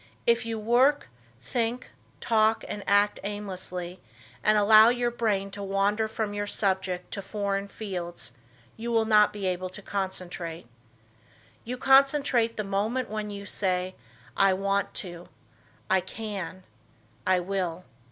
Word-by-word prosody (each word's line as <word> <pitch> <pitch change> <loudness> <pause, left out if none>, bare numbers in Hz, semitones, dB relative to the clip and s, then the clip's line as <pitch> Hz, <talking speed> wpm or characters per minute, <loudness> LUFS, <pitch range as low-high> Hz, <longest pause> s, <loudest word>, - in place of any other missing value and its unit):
If 235 0 +2
you 225 -1 -2
work, 245 +7 +3 0.3
think, 235 - -2 0.3
talk 220 +2 +2
and 205 -1 -5
act 205 +1 +3
aimlessly, 185 -3 -5 0.4
and 215 0 +4
allow 215 +2 +8
your 240 0 +1
brain 205 -4 -1
to 200 - -7
wander 200 +2 +1
from 215 -1 -3
your 205 0 -2
subject 190 -3 0
to 200 - -4
foreign 200 0 -2
fields, 180 - -6 0.5
you 235 +1 -4
will 225 -1 +3
not 210 -1 +5
be 205 -2 -5
able 185 0 -1
to 195 +3 -7
concentrate. 180 -5 -4 1.0
You 250 +2 -4
concentrate 270 -2 +4
at 230 - -23
the 215 - -1
moment 210 +5 -1
when 215 -1 -3
you 200 -1 -7
say, 185 -2 -1 0.4
"I 195 -1 +4
want 200 +1 0
to, 175 -1 -10 0.6
I 190 0 +3
can, 190 -2 -6 0.6
I 185 -1 +4
will." 180 -1 -3
205 Hz, 140 wpm, -27 LUFS, 190-225 Hz, 1.0 s, allow